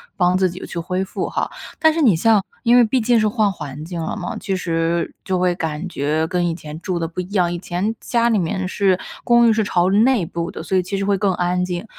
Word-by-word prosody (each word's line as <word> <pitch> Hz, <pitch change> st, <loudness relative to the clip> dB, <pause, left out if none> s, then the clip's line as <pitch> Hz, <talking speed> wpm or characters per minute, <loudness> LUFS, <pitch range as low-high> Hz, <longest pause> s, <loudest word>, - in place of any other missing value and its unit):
帮 180 Hz, -1 st, +2 dB
自 185 Hz, 0 st, +2 dB
己 180 Hz, +2 st, -8 dB
去 170 Hz, -, -5 dB
恢 180 Hz, +3 st, -2 dB
复 -, -, -4 dB
哈。 -, -, -2 dB, 0.3 s
但 315 Hz, -1 st, +4 dB
是 325 Hz, -, -1 dB
你 230 Hz, -, +5 dB
像 210 Hz, +4 st, +3 dB, 0.2 s
因 240 Hz, 0 st, +5 dB
为 245 Hz, -, +7 dB
毕 235 Hz, +3 st, +1 dB
竟 240 Hz, 0 st, +3 dB
是 215 Hz, -, +2 dB
换 210 Hz, -1 st, +1 dB
环 150 Hz, -4 st, -7 dB
境 170 Hz, 0 st, -5 dB
了 160 Hz, -, -3 dB
嘛， -, -, -4 dB
其 195 Hz, -, -2 dB
实 165 Hz, -1 st, -1 dB
就 185 Hz, -, -1 dB
会 180 Hz, 0 st, +2 dB
感 165 Hz, 0 st, -4 dB
觉 155 Hz, -1 st, -1 dB
跟 175 Hz, +1 st, 0 dB
以 165 Hz, -, -1 dB
前 155 Hz, -1 st, -9 dB
住 180 Hz, 0 st, -2 dB
的 165 Hz, -1 st, -2 dB
不 170 Hz, +2 st, -4 dB
一 180 Hz, -, -9 dB
样， 175 Hz, -3 st, +2 dB
以 175 Hz, -, -4 dB
前 190 Hz, +5 st, -2 dB
家 235 Hz, -1 st, +1 dB
里 220 Hz, -3 st, +2 dB
面 185 Hz, +2 st, -2 dB
是 190 Hz, -1 st, +1 dB, 0.2 s
公 240 Hz, -1 st, +5 dB
寓 225 Hz, -, +5 dB
是 220 Hz, 0 st, +1 dB
朝 180 Hz, -2 st, +1 dB
内 220 Hz, -1 st, +3 dB
部 170 Hz, 0 st, -4 dB
的， -, -, -7 dB
所 190 Hz, -, -2 dB
以 185 Hz, -, +4 dB
其 185 Hz, +2 st, -4 dB
实 195 Hz, -, -1 dB
会 200 Hz, 0 st, +2 dB
更 200 Hz, -1 st, +2 dB
安 180 Hz, +1 st, 0 dB
静。 180 Hz, +2 st, -3 dB
185 Hz, 280 characters per minute, -20 LUFS, 170-210 Hz, 0.3 s, 为